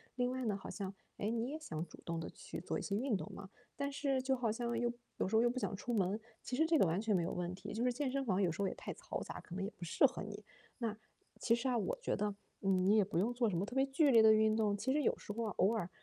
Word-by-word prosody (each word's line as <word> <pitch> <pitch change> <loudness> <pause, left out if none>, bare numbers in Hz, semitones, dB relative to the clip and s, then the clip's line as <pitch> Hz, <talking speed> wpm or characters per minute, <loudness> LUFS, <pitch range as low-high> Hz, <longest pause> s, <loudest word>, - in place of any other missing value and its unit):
另 250 0 +1
外 260 0 -2
呢， 205 -3 0
好 - - -9
像， 195 -2 -4 0.2
诶， 210 - -1
你 230 +2 -1
也 310 - -4
想 160 - -4
主 - - -14
动 165 -1 -3
地 160 - -4
去 - - -7
做 180 - -2
一 - - -4
些 200 - -2
运 245 -1 +1
动 - - -4
嘛， 195 -1 -9 0.3
但 280 0 -2
是 275 -1 0
就 265 0 +2
好 235 -4 0
像 235 +1 -2
又 240 0 +1 0.3
有 - - 0
时 210 - 0
候 225 - +6
又 240 - +4
不 255 - -3
想 - - -2
出 240 +5 -4
门， 200 -1 +1 0.2
其 250 - -4
实 320 +5 +4
这 320 -2 +3
个 190 - +5
完 165 +4 +1
全 215 -1 +1
没 175 - +3
有 170 - -1
问 180 0 -2
题， 185 - -7
就 225 - -1
是 250 0 +2
健 275 +1 -1
身 275 0 -1
房 195 -4 +2
有 180 -4 +3
时 185 +5 -2
候 195 - +2
也 - - -2
太 - - -6
嘈 - - -5
杂， - - -7
可 175 - -12
能 195 - -2
也 195 - -2
不 - - -8
适 170 - +4
合 250 - -6
你。 205 0 -7 0.4
那， 225 -3 -2 0.4
其 230 - +3
实 235 +3 +1
啊 250 - +2
我 - - -1
觉 - - 0
得， 205 -1 -1 0.3
嗯， 190 -2 +3
你 210 - +6
也 210 - +5
不 185 -3 -1
用 220 +6 +2
做 240 -1 +2
什 190 - -2
么 175 - +1
特 245 - -8
别 270 0 +4
剧 275 +2 +3
烈 230 -3 +8
的 220 - +8
运 215 0 +4
动， 215 -2 +2
其 215 +6 -1
实 295 +2 +2
有 - - +3
时 - - -7
候 230 +2 -2
啊 210 - -2
偶 195 +5 +4
尔， 200 -6 -2
220 Hz, 345 characters per minute, -36 LUFS, 195-250 Hz, 0.4 s, 烈